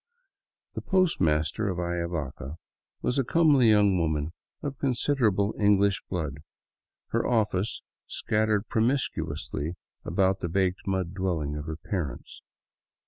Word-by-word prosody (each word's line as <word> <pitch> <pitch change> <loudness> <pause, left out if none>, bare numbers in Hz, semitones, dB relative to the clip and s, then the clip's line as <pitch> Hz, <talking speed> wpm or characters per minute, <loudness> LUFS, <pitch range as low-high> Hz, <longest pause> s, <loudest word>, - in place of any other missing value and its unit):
The - - -4
post 185 - +2
master 80 +6 +1
of 90 - -2
Ayavaca 85 -5 -3 0.5
was 125 - +1
a - - +3
comely 145 -4 +4
young 105 -3 +4
woman 80 -1 -1 0.3
of 140 -2 -4
con 135 -3 +1
siderable 110 -7 +2
Indian 100 -1 +4 0.2
blood, 75 -6 -3 0.7
her - - 0
office 110 -4 0 0.2
scattered 110 0 0
promiscuously 110 - -1 0.3
about 95 +2 +1
the 85 - -3
baked 95 +2 0
mud 95 -2 -1
dwelling 85 -6 -1
of 75 0 -5
her 80 -1 -4
parents. 85 -5 -5
95 Hz, 125 wpm, -27 LUFS, 85-110 Hz, 0.7 s, comely